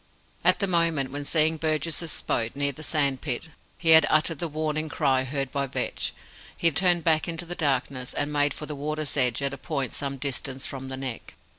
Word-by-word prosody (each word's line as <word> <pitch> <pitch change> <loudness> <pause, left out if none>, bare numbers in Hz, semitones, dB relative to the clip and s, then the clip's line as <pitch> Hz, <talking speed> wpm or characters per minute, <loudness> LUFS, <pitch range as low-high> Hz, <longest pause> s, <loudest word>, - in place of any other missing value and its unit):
At - - +5
the 200 - 0
moment 165 -7 +2
when, 145 +1 -5
seeing 160 +1 +2
Burgess's 160 +1 -1
boat 115 +1 -1
near 140 0 +2
the 140 - -11
sand 140 -4 +1
spit, 140 +2 -2 0.3
he 165 -2 +3
had 160 -2 +9
uttered 155 0 +2
the 170 - -2
warning 155 0 -2
cry 135 -4 +1
heard 135 0 -2
by 140 -1 -1
Vetch, - - -2 0.5
he 170 - +3
turned 175 +2 +3
back 160 -2 +3
into 170 0 -3
the 175 - -4
darkness, 135 -5 -1
and 145 +1 -1
made 145 0 +2
for 150 - -6
the 150 - -5
water's 150 +1 -3
edge 125 -1 +1
at 140 0 0
a 140 - -7
point 140 -6 -3
some 140 -1 -3
distance 135 0 -3
from 135 -1 -6
the 130 0 -5
Neck. 130 -3 -6
145 Hz, 205 wpm, -26 LUFS, 135-160 Hz, 0.5 s, had